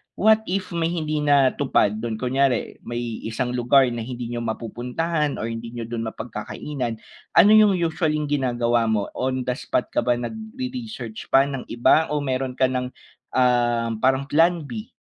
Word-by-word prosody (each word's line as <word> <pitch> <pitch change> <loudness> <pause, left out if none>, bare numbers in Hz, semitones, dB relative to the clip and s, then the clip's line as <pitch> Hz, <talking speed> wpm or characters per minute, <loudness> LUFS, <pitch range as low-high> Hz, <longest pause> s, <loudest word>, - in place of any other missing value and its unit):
What 220 +1 +3
if 190 +1 -2
may 165 -1 0
hindi 155 -3 -2
natupad 135 -6 +2
dun, 115 -1 -3
kunyari 130 +1 0
may 120 -1 -4
isang 125 +2 -2
lugar 125 +2 +4
na 120 - -4
hindi 120 0 -5
niyo 120 - -3
mapupuntahan 125 +7 -2
or 110 - -4
hindi 115 +1 -7
n'yo 115 - -4
do'n 115 0 -4
mapagkakainan, 115 +3 -5 0.4
ano 205 - +7
'yong 215 -2 +6
usually 165 -2 0 0.2
ginagawa 120 -4 +1
mo. 105 -2 0
On 130 0 -2
the 125 0 -1
spot - - -2
ka - - +1
ba 120 - +2
nag 120 - -5 0.2
re-research 230 - -6
pa 135 - +5
ng 135 -2 -5
iba 130 +6 +3
o 150 -1 -2
meron 130 -1 -2
ka 130 -1 +2
ng, 125 0 -1 0.5
ah, 120 -2 +2
parang 130 +2 +2
plan 165 +4 +2
b? 220 - -7
130 Hz, 170 wpm, -23 LUFS, 120-150 Hz, 0.5 s, ano